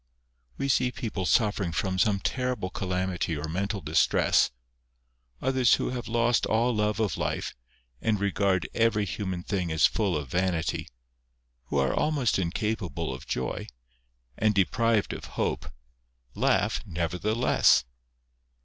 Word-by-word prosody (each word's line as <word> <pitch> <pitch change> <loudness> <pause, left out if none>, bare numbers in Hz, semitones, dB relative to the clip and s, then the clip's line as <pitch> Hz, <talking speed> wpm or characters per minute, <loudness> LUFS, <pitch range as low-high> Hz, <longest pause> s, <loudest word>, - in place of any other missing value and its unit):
We 140 - -1
see 125 -2 +2
people 105 -7 -3
suffering 105 -6 +2
from 95 +3 -1
some 100 -1 +3
terrible 125 -4 -2
calamity 90 -4 -2
or 75 +1 -4
mental 100 +5 -2
distress, 75 +1 +3 0.9
others 130 -2 +4
who - - -2
have 125 -1 -4
lost 120 +1 +2
all 115 +3 +2
love 105 0 0
of 110 -3 0
life, - - -2 0.5
and 110 -3 +1
regard 100 -2 +1
every 115 -2 +2
human 95 -2 -4
thing 90 -4 -2
as 80 0 +4
full 100 -7 +1
of 75 -2 -5
vanity, 90 -1 -1 0.8
who 70 - -2
are 70 -1 +2
almost 145 -9 +1
incapable 90 - -2
of 65 - -9
joy, - - -3 0.7
and 110 -1 +2
deprived 110 +2 +2
of - - -7
hope, 65 - -1 0.6
laugh - - +1
nevertheless. 90 - +2
100 Hz, 130 wpm, -27 LUFS, 90-115 Hz, 0.9 s, others